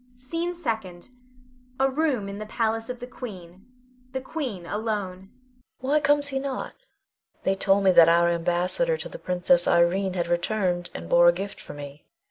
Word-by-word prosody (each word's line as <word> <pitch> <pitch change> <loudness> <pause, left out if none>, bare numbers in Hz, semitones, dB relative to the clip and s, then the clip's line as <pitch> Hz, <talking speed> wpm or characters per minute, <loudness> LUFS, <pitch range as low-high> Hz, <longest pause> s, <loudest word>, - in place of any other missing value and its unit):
SCENE 330 +8 -3
SECOND. 220 - -4 0.7
[A 270 - +4
room 270 -6 0
in 200 +1 -6
the 215 - -6
palace 225 +1 -1
of 250 -1 -5
The 245 - -6
Queen. 195 -6 -10 0.5
The 265 - -1
Queen 255 - -4
alone.] 200 -3 -4 0.5
Queen. 260 +2 -3
Why 300 - +4
comes 290 0 +3
he 270 -1 -2
not? 270 -1 -4 0.7
They 190 - +2
told 195 +1 +2
me 190 - +5
that 170 -2 +7
our 170 +1 +4
ambassador 175 - +1
to - - -6
the - - -9
Princess 180 -1 +2
Irene 185 +2 +2
had 175 -2 0
returned, 175 0 -1
and 85 - -6
bore 175 - +5
a - - +8
gift 195 +3 -6
for - - -10
me. 145 0 -10
200 Hz, 175 wpm, -25 LUFS, 175-255 Hz, 0.7 s, a